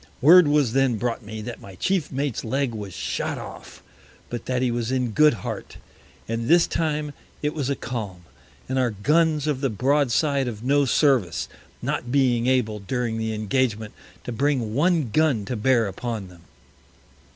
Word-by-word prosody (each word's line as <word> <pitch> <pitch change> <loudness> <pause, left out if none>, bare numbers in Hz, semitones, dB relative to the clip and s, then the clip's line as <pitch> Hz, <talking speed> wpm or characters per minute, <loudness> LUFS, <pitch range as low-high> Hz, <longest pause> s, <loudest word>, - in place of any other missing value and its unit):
Word 170 +4 +8
was 145 -5 +2
then 135 -3 +2
brought 120 +3 -2
me, 110 0 -7
that 120 +1 -7
my 95 -1 -11
Chief 185 - -1
Mate's 135 -2 -2
Leg 130 +2 -1
was 105 -3 -6
shot 65 -6 -3
off, - - -10 0.5
but 120 -2 -5
that 125 0 0
he 125 - +1
was 120 0 -2
in 125 -3 0
good 150 +3 +5
Heart. - - -6 0.5
All 115 - -2
this 160 +9 +4
time 150 -2 -2 0.3
it 150 +1 0
was 140 -4 -2
a 140 - +1
Calm, 105 -9 -6 0.4
and 130 0 -1
our 125 -2 +2
Guns 150 +8 +1
of 145 -4 -1
the 135 - +1
Broad 135 +4 +1
side 140 0 +1
of 110 -2 -6
no 140 +2 +3
Service, 120 - +2 0.4
not 120 - -2
being 125 -3 +2
able, 115 -5 +1
during 115 +2 -2
the 110 0 -2
Engagement, 110 0 -1 0.3
to - - -5
bring 125 -3 0
one 155 -2 +2
Gun 145 -9 +2
to 125 - -3
bear 120 +1 +2
upon 105 0 -5
them. 90 -2 -16
125 Hz, 175 wpm, -24 LUFS, 110-145 Hz, 0.5 s, Word